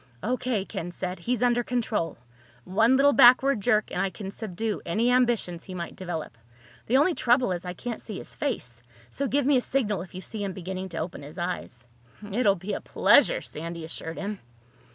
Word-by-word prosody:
"O.K.," 245 Hz, -4 st, -1 dB
Ken 195 Hz, -5 st, -5 dB
said. 180 Hz, +1 st, -5 dB
"He's 240 Hz, +6 st, -1 dB
under 240 Hz, 0 st, +3 dB
control. 225 Hz, -8 st, -1 dB, 0.5 s
One 225 Hz, -, +3 dB
little 285 Hz, +1 st, +5 dB
backward 255 Hz, -1 st, +6 dB
jerk 215 Hz, 0 st, +2 dB
and -, -, -1 dB
I 195 Hz, -, +1 dB
can 190 Hz, +2 st, -7 dB
subdue 215 Hz, +1 st, -3 dB
any 230 Hz, +8 st, +1 dB
ambitions 235 Hz, -9 st, +1 dB
he 185 Hz, -, -8 dB
might 170 Hz, -1 st, -5 dB
develop. 165 Hz, -10 st, -5 dB, 0.5 s
The 255 Hz, -, +4 dB
only 310 Hz, +6 st, +4 dB
trouble 245 Hz, -5 st, +2 dB
is 180 Hz, 0 st, -3 dB
I 180 Hz, -, -4 dB
can't 230 Hz, +5 st, -5 dB
see 210 Hz, -4 st, -6 dB
his -, -, -9 dB
face. 125 Hz, -, -4 dB, 0.3 s
So 280 Hz, -, -2 dB
give 280 Hz, +1 st, +1 dB
me 280 Hz, -1 st, +5 dB
a -, -, +2 dB
signal 215 Hz, -9 st, 0 dB
if 180 Hz, 0 st, -10 dB
you 185 Hz, -, -5 dB
see 210 Hz, +1 st, -6 dB
him 195 Hz, -2 st, -3 dB
beginning 185 Hz, 0 st, -5 dB
to 165 Hz, -, -7 dB
open 170 Hz, +3 st, -4 dB
his 145 Hz, +2 st, -11 dB
eyes." 170 Hz, -8 st, -4 dB, 0.4 s
"It 210 Hz, +3 st, 0 dB
will 200 Hz, -, +5 dB
be 195 Hz, +3 st, -5 dB
a -, -, -3 dB
pleasure," -, -, +4 dB
Sandy 165 Hz, +1 st, -6 dB
assured 160 Hz, 0 st, -6 dB
him. 205 Hz, 0 st, -4 dB
205 Hz, 200 wpm, -27 LUFS, 180-245 Hz, 0.5 s, backward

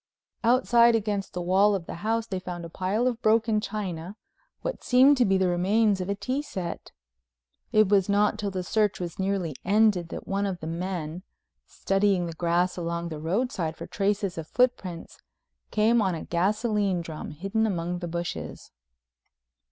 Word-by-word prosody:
Outside 235 Hz, -1 st, +5 dB
against 205 Hz, -3 st, -2 dB
the 180 Hz, -, -3 dB
wall 195 Hz, +3 st, +4 dB
of 180 Hz, -4 st, -4 dB
the -, -, -7 dB
house 225 Hz, +1 st, 0 dB
they 190 Hz, -4 st, -4 dB
found 175 Hz, -2 st, -6 dB
a -, -, -8 dB
pile 195 Hz, +7 st, -1 dB
of 245 Hz, -2 st, -1 dB
broken 220 Hz, -1 st, +3 dB
china, 190 Hz, -4 st, -5 dB, 0.5 s
what -, -, -4 dB
seemed 265 Hz, +3 st, +6 dB
to 245 Hz, -, +4 dB
be 195 Hz, 0 st, +3 dB
the 190 Hz, -1 st, +2 dB
remains 195 Hz, +3 st, +2 dB
of 185 Hz, -, -4 dB
a 200 Hz, -, 0 dB
tea 260 Hz, +7 st, -2 dB
set. 185 Hz, -11 st, -6 dB, 0.8 s
It 215 Hz, -3 st, +5 dB
was 195 Hz, -1 st, +3 dB
not 205 Hz, +1 st, +2 dB
till 205 Hz, -, -1 dB
the 185 Hz, -2 st, -3 dB
search 210 Hz, +2 st, +1 dB
was 175 Hz, -1 st, -6 dB
nearly 190 Hz, -6 st, -1 dB
ended 200 Hz, -3 st, +3 dB
that -, -, -7 dB
one 200 Hz, +1 st, 0 dB
of 185 Hz, -3 st, -4 dB
the 160 Hz, -, -7 dB
men, 170 Hz, 0 st, -4 dB, 0.5 s
studying 195 Hz, -2 st, +1 dB
the 165 Hz, -, -5 dB
grass 175 Hz, +2 st, 0 dB
along 170 Hz, 0 st, -3 dB
the 155 Hz, -2 st, -6 dB
roadside 170 Hz, -1 st, -1 dB
for -, -, -7 dB
traces 200 Hz, -3 st, -1 dB
of 160 Hz, -, -7 dB
footprints, 200 Hz, -9 st, -1 dB, 0.5 s
came 220 Hz, +2 st, +3 dB
on 190 Hz, -4 st, +1 dB
a 160 Hz, -, -6 dB
gasoline 200 Hz, +1 st, 0 dB
drum 160 Hz, -2 st, -7 dB
hidden 195 Hz, +8 st, -1 dB
among 175 Hz, -2 st, -2 dB
the 175 Hz, -, -4 dB
bushes. 165 Hz, -, -5 dB
195 Hz, 175 wpm, -26 LUFS, 175-215 Hz, 0.8 s, seemed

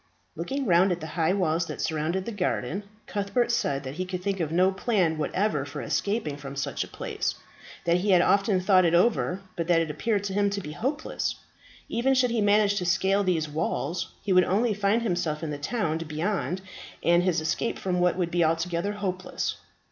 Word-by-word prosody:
Looking 275 Hz, 0 st, -3 dB
round 180 Hz, -1 st, +4 dB
at 175 Hz, -, -1 dB
the 160 Hz, -, -6 dB
high 165 Hz, +1 st, +2 dB
walls 170 Hz, -3 st, +1 dB
that -, -, -6 dB
surrounded 165 Hz, +4 st, -1 dB
the 235 Hz, -, -4 dB
garden, 200 Hz, 0 st, -1 dB, 0.2 s
Cuthbert 210 Hz, +5 st, 0 dB
said 140 Hz, -11 st, 0 dB
that 130 Hz, 0 st, -5 dB
he 185 Hz, +5 st, -3 dB
could 180 Hz, -1 st, -5 dB
think 195 Hz, -1 st, -1 dB
of 160 Hz, -3 st, -1 dB
no 185 Hz, +3 st, +4 dB
plan 190 Hz, -6 st, +1 dB
whatever 180 Hz, -2 st, 0 dB
for 145 Hz, -, -7 dB
escaping 200 Hz, -8 st, -1 dB
from 140 Hz, -1 st, -8 dB
such 140 Hz, -, -2 dB
a -, -, -9 dB
place; -, -, -3 dB, 0.5 s
that 170 Hz, 0 st, +3 dB
he 195 Hz, +3 st, -1 dB
had 180 Hz, -2 st, +6 dB
often 200 Hz, 0 st, +3 dB
thought 185 Hz, 0 st, +4 dB
it 170 Hz, -1 st, +3 dB
over, 190 Hz, -1 st, +2 dB
but 170 Hz, -1 st, -2 dB
that 175 Hz, -2 st, +4 dB
it 165 Hz, -2 st, -1 dB
appeared 205 Hz, +6 st, -1 dB
to 200 Hz, -1 st, -3 dB
him 205 Hz, 0 st, +2 dB
to 200 Hz, 0 st, -2 dB
be 150 Hz, -6 st, -7 dB
hopeless. 270 Hz, -, -2 dB, 0.5 s
Even 265 Hz, +3 st, +1 dB
should 250 Hz, -2 st, +3 dB
he 230 Hz, -2 st, +1 dB
manage 205 Hz, 0 st, +3 dB
to 180 Hz, -, -3 dB
scale 190 Hz, +3 st, +2 dB
these 170 Hz, -5 st, +1 dB
walls, 160 Hz, +3 st, -2 dB, 0.2 s
he 200 Hz, -, +1 dB
would 185 Hz, 0 st, +6 dB
only 215 Hz, +4 st, +2 dB
find 210 Hz, +3 st, +1 dB
himself 175 Hz, -6 st, -1 dB
in 155 Hz, -, -3 dB
the 145 Hz, -, -4 dB
town 160 Hz, -1 st, -1 dB
beyond, 170 Hz, +4 st, -2 dB, 0.4 s
and 170 Hz, +1 st, +4 dB
his 180 Hz, -2 st, +1 dB
escape 160 Hz, +8 st, -1 dB
from 180 Hz, -2 st, -1 dB
that 180 Hz, 0 st, +2 dB
would 175 Hz, -2 st, -1 dB
be 175 Hz, 0 st, +2 dB
altogether 170 Hz, +4 st, 0 dB
hopeless. 185 Hz, -3 st, -3 dB
185 Hz, 205 wpm, -27 LUFS, 165-205 Hz, 0.5 s, had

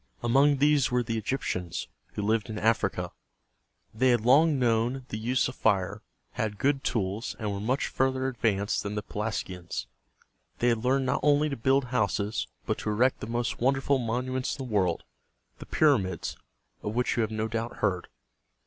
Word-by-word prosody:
Among 135 Hz, +4 st, +4 dB
these 145 Hz, -1 st, +4 dB
were 125 Hz, 0 st, +1 dB
the 115 Hz, -1 st, -2 dB
E -, -, -6 dB
gyp´tians, 90 Hz, -8 st, -2 dB, 0.3 s
who 105 Hz, -, -3 dB
lived 110 Hz, +2 st, +1 dB
in 110 Hz, -, -4 dB
Africa. 110 Hz, +1 st, +1 dB, 0.8 s
They 130 Hz, +4 st, +3 dB
had 120 Hz, -2 st, +3 dB
long 145 Hz, +6 st, +5 dB
known 120 Hz, +1 st, +1 dB
the 110 Hz, -, -3 dB
use 125 Hz, +4 st, +1 dB
of 130 Hz, -, -5 dB
fire, 100 Hz, +1 st, +1 dB, 0.3 s
had 105 Hz, -2 st, -3 dB
good 135 Hz, +2 st, +1 dB
tools, 105 Hz, 0 st, -2 dB
and 105 Hz, -3 st, -2 dB
were 100 Hz, -, -3 dB
much 125 Hz, +7 st, 0 dB
further 130 Hz, 0 st, 0 dB
advanced 110 Hz, -5 st, 0 dB
than 100 Hz, +1 st, -4 dB
the 105 Hz, -, -2 dB
Pelasgians. 95 Hz, -5 st, -4 dB, 0.7 s
They 120 Hz, -, +2 dB
had 115 Hz, -1 st, 0 dB
learned 135 Hz, +1 st, +2 dB
not -, -, +1 dB
only 150 Hz, +1 st, +3 dB
to 140 Hz, -, -2 dB
build 135 Hz, +3 st, +2 dB
houses, 110 Hz, -4 st, 0 dB, 0.2 s
but -, -, -1 dB
to -, -, -3 dB
erect 120 Hz, +5 st, +2 dB
the -, -, -6 dB
most 120 Hz, +1 st, -2 dB
wonderful 135 Hz, +1 st, +2 dB
monuments 125 Hz, +2 st, -2 dB
in 135 Hz, -, -5 dB
the 120 Hz, -, -7 dB
world, 90 Hz, -5 st, +1 dB, 0.6 s
the -, -, -10 dB
Pyr´a 145 Hz, -8 st, +4 dB
mids, 95 Hz, -3 st, -4 dB, 0.5 s
of 105 Hz, +1 st, -4 dB
which 125 Hz, 0 st, +1 dB
you 120 Hz, -, +1 dB
have 110 Hz, -, 0 dB
no 110 Hz, 0 st, -2 dB
doubt 115 Hz, +1 st, -3 dB
heard. 95 Hz, -4 st, -1 dB
115 Hz, 185 wpm, -28 LUFS, 105-130 Hz, 0.8 s, long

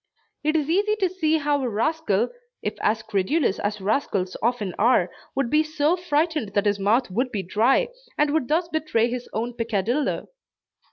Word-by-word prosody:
It 305 Hz, +1 st, +1 dB
is 300 Hz, -3 st, +1 dB
easy 410 Hz, +6 st, +2 dB
to 390 Hz, -4 st, +1 dB
see 320 Hz, -3 st, +1 dB
how 290 Hz, -1 st, 0 dB
a 255 Hz, -, -1 dB
rascal, 230 Hz, -2 st, 0 dB, 0.3 s
if -, -, -1 dB
as 220 Hz, +1 st, +1 dB
credulous 220 Hz, -, 0 dB
as 205 Hz, +1 st, -2 dB
rascals 195 Hz, -3 st, -1 dB
often 220 Hz, -5 st, 0 dB
are, 210 Hz, -6 st, +3 dB, 0.2 s
would 270 Hz, -3 st, 0 dB
be 305 Hz, -, +5 dB
so 310 Hz, +1 st, +1 dB
frightened 305 Hz, -, -1 dB
that 205 Hz, 0 st, +2 dB
his 205 Hz, -1 st, +1 dB
mouth 215 Hz, +3 st, +2 dB
would 250 Hz, +6 st, 0 dB
be 200 Hz, -3 st, -2 dB
dry, 220 Hz, +8 st, +2 dB, 0.3 s
and 295 Hz, -1 st, +3 dB
would 310 Hz, -5 st, +1 dB
thus 330 Hz, +3 st, +1 dB
betray 295 Hz, -8 st, 0 dB
his 245 Hz, 0 st, -5 dB
own 235 Hz, +3 st, -2 dB
peccadillo. 230 Hz, +4 st, -1 dB
250 Hz, 175 wpm, -24 LUFS, 210-310 Hz, 0.3 s, be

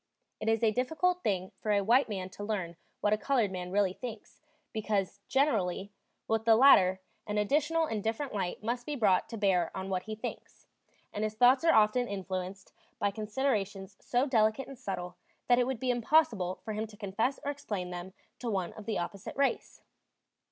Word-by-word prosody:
It 220 Hz, -, -1 dB
is 225 Hz, 0 st, +1 dB
a 220 Hz, -, +5 dB
difficult 320 Hz, -, 0 dB
thing 190 Hz, -, -1 dB
for 215 Hz, -, -1 dB
a 200 Hz, -1 st, +3 dB
white 240 Hz, +5 st, +4 dB
man 190 Hz, -3 st, -4 dB
to 205 Hz, -, -8 dB
learn 190 Hz, -5 st, -3 dB, 0.3 s
what 210 Hz, -, +3 dB
a 215 Hz, -, +1 dB
colored 230 Hz, -3 st, +1 dB
man 180 Hz, -1 st, -5 dB
really 195 Hz, -1 st, +2 dB
thinks; 230 Hz, -1 st, -9 dB, 0.3 s
because, 205 Hz, -3 st, -1 dB
generally, 205 Hz, -8 st, +1 dB, 0.4 s
with 225 Hz, 0 st, +1 dB
the 225 Hz, 0 st, +6 dB
latter 190 Hz, -7 st, +6 dB, 0.3 s
an 210 Hz, 0 st, -2 dB
additional 300 Hz, +9 st, +2 dB
and 220 Hz, -8 st, -3 dB
different 230 Hz, +5 st, -2 dB
light 190 Hz, -1 st, -3 dB
must 240 Hz, +2 st, -2 dB
be 300 Hz, -, -2 dB
brought 205 Hz, -8 st, +2 dB
to 230 Hz, -, -6 dB
bear 185 Hz, -5 st, +2 dB
on 190 Hz, 0 st, -4 dB
what 185 Hz, -1 st, 0 dB
he 215 Hz, 0 st, -5 dB
thinks; 215 Hz, -, -8 dB, 0.5 s
and 210 Hz, -, -2 dB
his 215 Hz, 0 st, -2 dB
thoughts 250 Hz, +5 st, +5 dB
are 330 Hz, -, +5 dB
often 220 Hz, +3 st, +4 dB
influenced 190 Hz, -1 st, -5 dB, 0.2 s
by 205 Hz, -, +1 dB
considerations 210 Hz, -3 st, -2 dB
so 245 Hz, +2 st, +1 dB
delicate 225 Hz, -1 st, +2 dB
and 275 Hz, -3 st, -10 dB
subtle 180 Hz, -7 st, -5 dB, 0.3 s
that 245 Hz, 0 st, +5 dB
it 245 Hz, -, +2 dB
would 260 Hz, -3 st, -2 dB
be 255 Hz, 0 st, +1 dB
impossible 230 Hz, -, +2 dB
for 220 Hz, -, -3 dB
him 215 Hz, +1 st, -3 dB
to 210 Hz, -1 st, -15 dB
confess 220 Hz, +6 st, -1 dB
or 285 Hz, -, 0 dB
explain 205 Hz, -10 st, -5 dB
them 180 Hz, +1 st, -7 dB, 0.3 s
to 240 Hz, -, -3 dB
one 190 Hz, -5 st, -2 dB
of 215 Hz, -, -11 dB
the 220 Hz, -, 0 dB
opposite 185 Hz, +2 st, -5 dB
race. 275 Hz, 0 st, -1 dB
215 Hz, 195 wpm, -31 LUFS, 195-245 Hz, 0.5 s, the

